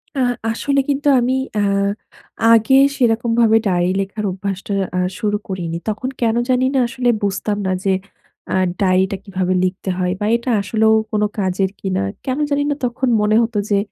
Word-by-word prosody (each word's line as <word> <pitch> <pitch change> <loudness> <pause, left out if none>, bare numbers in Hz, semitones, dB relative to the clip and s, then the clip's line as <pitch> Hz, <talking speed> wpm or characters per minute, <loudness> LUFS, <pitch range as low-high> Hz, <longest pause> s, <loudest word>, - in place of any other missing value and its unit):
আ - - -2 0.3
আসলে 275 +5 0
কিন্তু 285 +1 0
আমি 245 +1 +1 0.3
আ - - +2 0.9
আগে 230 +4 +4 0.2
সেরকম 235 -2 +1
ভাবে 225 -1 +5
ডায়েরি 180 -1 +1
লেখার 200 +2 -4
অভ্যাসটা 195 +1 -4 0.2
আ - - +2 0.2
শুরু 210 -2 0
করিনি। 175 -3 -4
তখন 215 +5 -3
কেন 230 -1 +2
জানিনা 260 +1 +2
আসলে 245 0 -1
বুঝতাম 205 +1 -1
না - - 0
যে, 195 -1 +2 0.6
আ - - +1 0.3
ডায়েরিটা 190 +1 +2
কিভাবে 185 -2 -1
লিখতে 185 +1 -2
হয় 180 -1 0
বা 205 - -2
এটা 235 +2 -3
আসলেও 220 +2 +2 0.2
কোনো 210 -1 +1
কাজের 190 0 0
কিনা। 185 - -1 0.2
কেন 260 +1 -1
জানিনা 290 0 +1
তখন 245 +2 -1
মনে 210 +1 +2
হতো 230 -1 -1
যে 205 - +3
210 Hz, 165 wpm, -19 LUFS, 190-240 Hz, 0.9 s, ভাবে